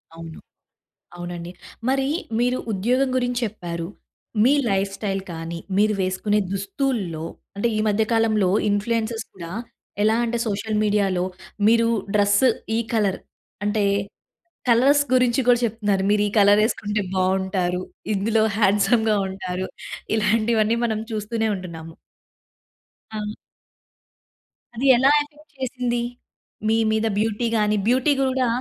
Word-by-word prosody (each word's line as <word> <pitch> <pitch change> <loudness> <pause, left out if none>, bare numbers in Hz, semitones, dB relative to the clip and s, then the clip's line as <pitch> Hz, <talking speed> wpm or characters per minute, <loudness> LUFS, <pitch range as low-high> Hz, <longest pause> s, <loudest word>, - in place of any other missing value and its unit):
అవును. 165 -1 -9 0.8
అవునండి. 175 0 -6 0.4
మరి 270 0 +1 0.3
మీరు 250 +1 +1
ఉద్యోగం 245 +7 +1
గురించి 245 -1 0
చెప్పారు. 170 -5 -5 0.6
మీ 260 - +5 0.2
లైఫ్ 195 0 +1
స్టైల్ 195 -2 -2
కానీ, 165 +1 -5 0.2
మీరు 210 +1 +3
వేసుకునే 190 +3 0
దుస్తుల్లో, 200 - -2 0.3
అంటే 205 +4 +1
ఈ - - +1
మధ్య 210 +1 +2
కాలంలో 220 -4 +2 0.2
ఇన్ఫ్లూయెన్సర్స్ 225 +2 -1
కూడా 170 -3 -8 0.5
ఎలా 220 +1 +3
అంటే 235 0 -1
సోషల్ 215 +1 -2
మీడియాలో 200 -4 +1 0.4
మీరు 230 +1 +4 0.3
డ్రెస్ 205 +1 +3 0.3
ఈ - - +1
కలర్ 210 -4 +1 0.5
అంటే 210 +1 +1 0.9
కలర్స్ 270 +5 +5
గురించి 250 -1 +3
కూడా 245 -1 +6
చెప్తున్నారు. 210 -4 0
మీరు 210 0 +3
ఈ - - -5
కలర్ 205 +1 +6
వేసుకుంటే 210 -1 -1
బావుంటారు, 185 -1 0 0.3
ఇందులో 215 +3 +1 0.2
హ్యాండ్సమ్‌గా 215 +2 +3
ఉంటారు, 185 -1 -4 0.5
ఇలాంటివన్నీ 220 +1 +2
మనం 220 -2 0
చూస్తూనే 220 +1 -1
ఉంటున్నాము. 165 -3 -9 1.2
ఆ! 215 - -2 1.5
అది 250 +5 -2
ఎలా 265 +3 +5
ఎఫెక్ట్ 300 +1 -12
చేసింది? 250 -2 -1 0.7
మీ 220 - +3 0.2
మీద 220 0 +1
బ్యూటీ 225 +2 0
గాని, 210 0 +2
బ్యూటీ 255 +4 +3
కూడా 260 -1 +1
215 Hz, 115 wpm, -23 LUFS, 195-235 Hz, 1.5 s, కూడా